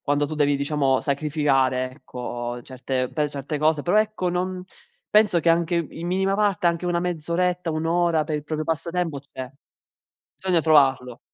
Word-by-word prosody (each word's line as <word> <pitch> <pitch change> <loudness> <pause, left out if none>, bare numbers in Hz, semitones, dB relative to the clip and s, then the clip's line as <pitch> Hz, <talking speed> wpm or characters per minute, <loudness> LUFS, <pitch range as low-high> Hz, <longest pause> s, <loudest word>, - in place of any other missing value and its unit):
quando 145 0 0
tu 155 - -5
devi 145 -1 +2
diciamo 140 -2 +1
sacrificare, 140 -3 +1
ecco, 120 -3 -6
certe 130 0 -3
per 150 -2 0
certe 145 +1 -4
cose, 155 -1 +2
però 180 +5 +3
ecco 215 -4 -2
non 180 +1 -2 0.5
penso 210 -5 +4
che 170 - +3
anche 170 +1 +1
i 165 -1 -3
in 170 - -4
minima 190 +2 +1
parte 200 -4 +1
anche 170 +1 +1
una 175 -1 +1
mezz'oretta, 175 +1 -1
1 155 +1 -2
ora 170 -2 +2
per 155 -1 -2
il 150 - -4
proprio 155 +1 -3
passatempo 165 -1 -2
c'è, 130 -2 -9 0.9
bisogna 180 -3 +1
trovarlo. 135 -6 +3
155 Hz, 170 wpm, -24 LUFS, 140-175 Hz, 0.9 s, penso